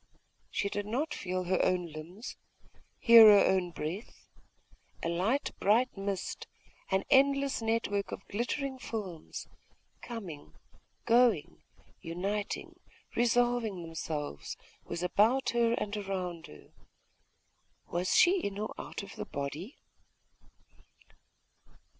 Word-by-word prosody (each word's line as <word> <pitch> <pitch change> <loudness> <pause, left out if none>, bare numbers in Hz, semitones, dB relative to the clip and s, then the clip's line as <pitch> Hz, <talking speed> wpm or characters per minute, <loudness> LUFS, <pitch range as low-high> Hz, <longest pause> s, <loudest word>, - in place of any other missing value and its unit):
She 200 - -1
did 205 0 -3
not 285 +8 -1
feel 185 0 -3
her 185 +1 +1
own 180 -2 +1
limbs, 170 - -8 0.6
hear 230 -2 +9
her 205 -1 +8
own 185 -2 +2
breath.... 175 +6 -6 0.7
A 165 - 0
light 200 - 0
bright 230 +6 +3
mist, 195 -1 -4 0.4
an 190 0 +1
endless 275 -1 +4
network 225 -3 0
of - - -7
glittering 260 +5 -2
films, 195 -10 -6 0.5
coming, 170 - -8 0.5
going, 235 -9 +3 0.4
uniting, 195 +5 -4 0.4
resolving 240 -5 +2
themselves, 155 - -5 0.3
was 170 +1 -4
above 220 +9 +3
her 235 -1 +3
and 210 -2 -2
around 185 -4 -4
her.... 75 - -15 1.1
Was 175 +2 -1
she 370 +2 +6
in 200 -1 -3
the 205 - -4
body 215 - -3
or - - -4
out - - -6
of 195 - -10
the - - -4
body?.... 145 - -5
200 Hz, 115 wpm, -31 LUFS, 180-235 Hz, 1.1 s, hear